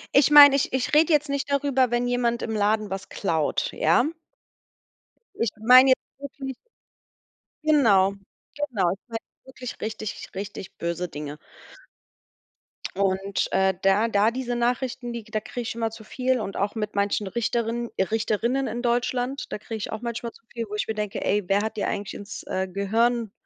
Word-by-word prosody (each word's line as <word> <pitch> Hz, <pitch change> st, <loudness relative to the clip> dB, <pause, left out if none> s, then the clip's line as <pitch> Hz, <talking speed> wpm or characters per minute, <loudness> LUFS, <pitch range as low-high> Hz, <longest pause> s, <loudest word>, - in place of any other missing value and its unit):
Ich 280 Hz, 0 st, +6 dB
mein, 290 Hz, -1 st, +10 dB
ich 275 Hz, -, +1 dB
ich 260 Hz, +1 st, -1 dB
red 310 Hz, +2 st, +5 dB
jetzt 300 Hz, -2 st, +3 dB
nicht 280 Hz, 0 st, -2 dB
darüber, 275 Hz, -3 st, +2 dB
wenn 240 Hz, +1 st, 0 dB
jemand 245 Hz, -1 st, 0 dB
im -, -, -3 dB
Laden 210 Hz, 0 st, +1 dB
was 195 Hz, 0 st, -5 dB
klaut, 160 Hz, -6 st, -1 dB
ja? 170 Hz, -, +3 dB, 1.3 s
Ich 230 Hz, -, 0 dB
mein 250 Hz, +4 st, +8 dB
jetzt 260 Hz, -, +5 dB, 0.2 s
wirklich 275 Hz, -1 st, -6 dB, 1.1 s
genau, 215 Hz, -11 st, +4 dB, 0.4 s
genau. 240 Hz, -12 st, 0 dB
Ich 190 Hz, -, -5 dB
mein 230 Hz, -2 st, -4 dB, 0.3 s
wirklich 260 Hz, -2 st, -8 dB
richtig, 215 Hz, -1 st, -5 dB
richtig 195 Hz, -1 st, -6 dB
böse 170 Hz, +1 st, -2 dB
Dinge. 150 Hz, -2 st, -7 dB, 1.6 s
Und, 195 Hz, 0 st, 0 dB
äh, 190 Hz, 0 st, +3 dB
da 195 Hz, +4 st, +3 dB
da 210 Hz, -1 st, +3 dB
diese 245 Hz, 0 st, -3 dB
Nachrichten, 245 Hz, 0 st, -1 dB
die 235 Hz, -1 st, -5 dB
da 215 Hz, 0 st, -3 dB
kriege 245 Hz, +3 st, -6 dB
ich 230 Hz, -, -4 dB
immer 230 Hz, -1 st, -1 dB
zu 225 Hz, 0 st, -11 dB
viel 255 Hz, +3 st, 0 dB
und 195 Hz, -3 st, -5 dB
auch 200 Hz, +3 st, -1 dB
mit 210 Hz, -1 st, -3 dB
manchen 200 Hz, +1 st, 0 dB
Richterin 235 Hz, +2 st, -1 dB
Richterrinnen 225 Hz, +6 st, 0 dB
in 240 Hz, +2 st, -4 dB
Deutschland, 245 Hz, +2 st, -1 dB
da -, -, -2 dB
kriege 220 Hz, +2 st, -6 dB
ich 215 Hz, -, -5 dB
auch 220 Hz, -, -5 dB
manchmal 235 Hz, -1 st, -4 dB
zu -, -, -21 dB
viel, 235 Hz, -1 st, -3 dB
wo 210 Hz, -, -4 dB
ich 210 Hz, -, -2 dB
mir 220 Hz, -, -1 dB
denke: 210 Hz, 0 st, -3 dB
„Ey, 205 Hz, 0 st, +2 dB
wer 200 Hz, +1 st, +3 dB
hat 220 Hz, -, -3 dB
die 210 Hz, -, -1 dB
eigentlich 205 Hz, -2 st, -3 dB
ins, 205 Hz, -, -8 dB
äh, 190 Hz, 0 st, -2 dB
Gehirn 220 Hz, +4 st, 0 dB
225 Hz, 175 wpm, -25 LUFS, 205-250 Hz, 1.6 s, mein